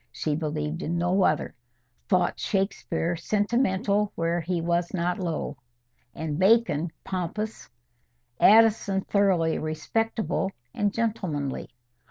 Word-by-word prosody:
She 150 Hz, -2 st, -2 dB
believed 155 Hz, +1 st, -3 dB
in 170 Hz, 0 st, -2 dB
no 180 Hz, +3 st, +2 dB
other; -, -, 0 dB, 0.6 s
thought 180 Hz, -2 st, +2 dB
Shakespeare 190 Hz, -4 st, -1 dB
sentimental 205 Hz, +1 st, +1 dB
where 170 Hz, +1 st, 0 dB
he 175 Hz, +1 st, -1 dB
was 170 Hz, +1 st, 0 dB
not 180 Hz, +1 st, -1 dB
low, 160 Hz, -5 st, -3 dB, 0.6 s
and 160 Hz, -1 st, -3 dB
Bacon 190 Hz, -6 st, +3 dB
pompous; 195 Hz, -, -4 dB, 0.7 s
Addison 215 Hz, -3 st, +5 dB
thoroughly 190 Hz, -6 st, +2 dB
respectable 195 Hz, +6 st, -1 dB, 0.2 s
and 205 Hz, -1 st, 0 dB
gentlemanly. 185 Hz, -12 st, -2 dB
180 Hz, 105 wpm, -26 LUFS, 165-205 Hz, 0.7 s, Addison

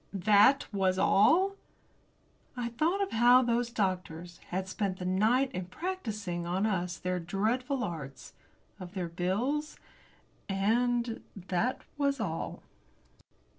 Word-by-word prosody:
That 205 Hz, +7 st, +5 dB
was 190 Hz, -2 st, +1 dB
all? 330 Hz, -, +4 dB, 1.0 s
I 240 Hz, -1 st, -2 dB
thought 325 Hz, -, 0 dB
of 390 Hz, -, -4 dB
how 245 Hz, +3 st, +6 dB
those 240 Hz, 0 st, 0 dB
doctors 180 Hz, -5 st, -3 dB
had 185 Hz, +1 st, -3 dB
spent 190 Hz, -1 st, -2 dB
the 180 Hz, -, -6 dB
night 220 Hz, +9 st, +2 dB
in 185 Hz, -8 st, -4 dB
practising 210 Hz, -, -4 dB
on 185 Hz, +4 st, 0 dB
us 180 Hz, -4 st, -1 dB
their 180 Hz, 0 st, -2 dB
dreadful 235 Hz, -, -1 dB
arts, 140 Hz, -, -7 dB, 0.5 s
of 185 Hz, +1 st, -9 dB
their 180 Hz, -3 st, -3 dB
bills, 230 Hz, -, -1 dB, 0.7 s
and 235 Hz, +4 st, +1 dB
that 195 Hz, +6 st, -2 dB, 0.2 s
was 280 Hz, -1 st, +1 dB
all. 165 Hz, -7 st, -4 dB
205 Hz, 120 wpm, -30 LUFS, 180-245 Hz, 1.0 s, how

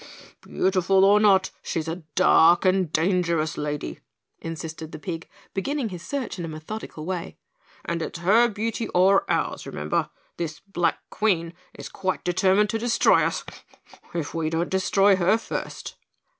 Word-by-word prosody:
"Beautiful 190 Hz, 0 st, +2 dB
or 205 Hz, +1 st, +6 dB
not, 195 Hz, -3 st, +4 dB
she's 160 Hz, -1 st, -3 dB
a 165 Hz, +1 st, -3 dB, 0.2 s
dark 175 Hz, -1 st, +5 dB
and 185 Hz, -3 st, +2 dB
dangerous 170 Hz, -2 st, +1 dB
lady," 150 Hz, 0 st, -4 dB, 0.4 s
insisted 160 Hz, -1 st, -7 dB
the -, -, -7 dB
pig, 165 Hz, -1 st, -6 dB, 0.2 s
beginning 270 Hz, +4 st, -2 dB
his 180 Hz, -3 st, -8 dB
search 265 Hz, -1 st, -4 dB
in 170 Hz, -, -3 dB
a -, -, -5 dB
methodical 155 Hz, +1 st, -7 dB
way, 180 Hz, -1 st, -4 dB, 0.5 s
"and 170 Hz, 0 st, -2 dB
it's 160 Hz, -, -4 dB
her 210 Hz, +8 st, +4 dB
beauty 225 Hz, +1 st, -3 dB
or 190 Hz, +2 st, +4 dB
ours, -, -, -1 dB
remember, 75 Hz, +1 st, -2 dB, 0.3 s
this 160 Hz, -2 st, -4 dB
Black 175 Hz, -3 st, -2 dB
Queen 175 Hz, -6 st, 0 dB, 0.2 s
is -, -, -8 dB
quite 185 Hz, -1 st, -3 dB
determined 190 Hz, +3 st, +2 dB
to 225 Hz, -, -1 dB
destroy 235 Hz, +1 st, +3 dB
us, -, -, -1 dB, 0.7 s
if 165 Hz, -4 st, -3 dB
we 160 Hz, -1 st, -1 dB
don't 165 Hz, +2 st, -1 dB
destroy 195 Hz, +1 st, +3 dB
her 190 Hz, +4 st, +3 dB
first." 225 Hz, -, -6 dB
185 Hz, 150 wpm, -24 LUFS, 165-200 Hz, 0.7 s, or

